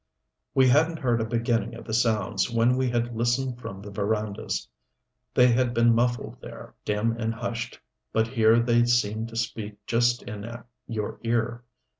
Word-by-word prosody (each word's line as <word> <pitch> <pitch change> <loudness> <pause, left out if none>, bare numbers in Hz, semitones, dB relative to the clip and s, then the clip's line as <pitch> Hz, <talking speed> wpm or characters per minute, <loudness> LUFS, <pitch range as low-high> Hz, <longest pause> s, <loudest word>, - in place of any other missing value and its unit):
We 130 -1 +6
hadn't 155 +6 +4
heard 120 -6 +1
a - - 0
beginning 115 -1 0
of 115 - -10
the 110 - -5
sounds 110 -2 +1
when 115 +1 +3
we 130 -1 +1
had 120 0 -1
listened 120 +2 0
from 95 -3 -7
the 100 - -8
verandas. 105 0 -2 0.7
They 125 - +7
had 120 0 +1
been 115 0 +5
muffled 120 +1 0
there, - - -10
dim 105 +2 0
and 115 -1 0
hushed, 120 0 -4 0.3
but 110 0 +2
here 115 -2 +4
they 120 0 +3
seemed 115 -2 +1
to 115 - -11
speak 110 -2 -3
just 120 +1 +2
in 105 +2 -7 0.4
your 110 -3 -4
ear. 115 +1 -1
115 Hz, 165 wpm, -26 LUFS, 110-120 Hz, 0.7 s, They